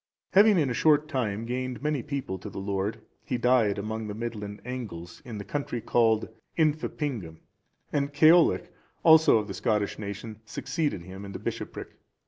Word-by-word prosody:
Having 205 +1 +7
in 150 -4 +3
a 125 - -1
short 150 +3 +4
time 115 -7 -2
gained 125 +2 -3
many 150 -3 0
people 135 -10 -4
to 105 - -7
the - - -10
Lord, 100 +2 -2 0.2
he 125 - -2
died 120 -4 +3
among 110 +2 -4
the 105 - -5
Midland 105 -3 -5
Angles, 105 -10 -6
in 115 -3 -7
the 100 - -5
country 140 +3 -3
called 115 -1 +2 0.3
Infeppingum;(410) 145 - -1 0.6
and 140 -1 0
Ceollach, 160 +4 +5 0.3
also 160 -6 +7
of 105 -1 -2
the 100 - -5
Scottish 100 +2 0
nation, 105 +1 -6
succeeded 145 - -2
him 95 +2 -9
in 100 0 -8
the - - -4
bishopric. - - -6
115 Hz, 165 wpm, -27 LUFS, 105-145 Hz, 0.6 s, Having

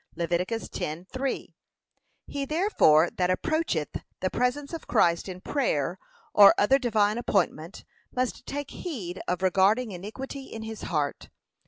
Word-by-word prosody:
(Lev. 170 -1 -2
10:3) 185 - -3 0.7
He 280 -1 -4
therefore 275 - +4
that 180 -1 0
approacheth 185 - 0 0.2
the 185 - -1
presence 280 +5 -1
of 330 - -6
Christ 170 +2 +2
in 185 0 -7
prayer, 185 - -1 0.3
or 200 -1 +9
any - - +4
other 270 +6 +4
divine 220 -3 +2
appointment, 180 -5 -1 0.3
must 255 -1 -2
take 285 0 -4
heed 195 - -5
of 180 +1 -1
regarding 200 +5 +3
'iniquity 260 +9 -7
in 225 -3 -8
his 220 -1 -7
heart.' 150 -4 -2
205 Hz, 135 wpm, -27 LUFS, 180-265 Hz, 0.7 s, or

